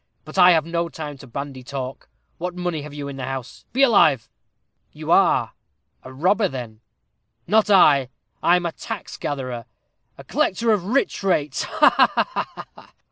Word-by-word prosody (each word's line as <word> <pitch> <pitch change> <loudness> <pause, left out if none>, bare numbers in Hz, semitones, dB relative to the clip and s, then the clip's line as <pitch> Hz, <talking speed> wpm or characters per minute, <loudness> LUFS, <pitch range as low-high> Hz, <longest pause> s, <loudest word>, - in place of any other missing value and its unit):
But 155 - -11
I 180 0 +8
have 160 -2 +2
no 170 0 -2
time 150 -4 -7
to 135 - -12
bandy 135 +1 -6
talk. 130 0 -7 0.3
What 180 +1 -4
money 175 -3 -3
have 150 0 -9
you 145 -1 -5
in 140 -1 -7
the 130 - -4
house? 135 -1 -7
Be 270 +2 +2
alive." 200 - +4 0.6
"You - - -5
are - - +3 0.5
a 130 - -11
robber, 190 +10 +2
then?" 120 -7 -8 0.6
"Not 215 0 +3
I. 145 -10 +5 0.3
I'm 175 0 +3
a 170 - -1
tax 225 +4 -7
gatherer 130 -5 -4 0.5
a - - -11
collector 230 +4 0
of 200 -5 +1
Rich 255 +7 0
Rates 150 -8 0
ha, - - +2 0.2
ha! - - -19
150 Hz, 160 wpm, -22 LUFS, 135-180 Hz, 0.6 s, I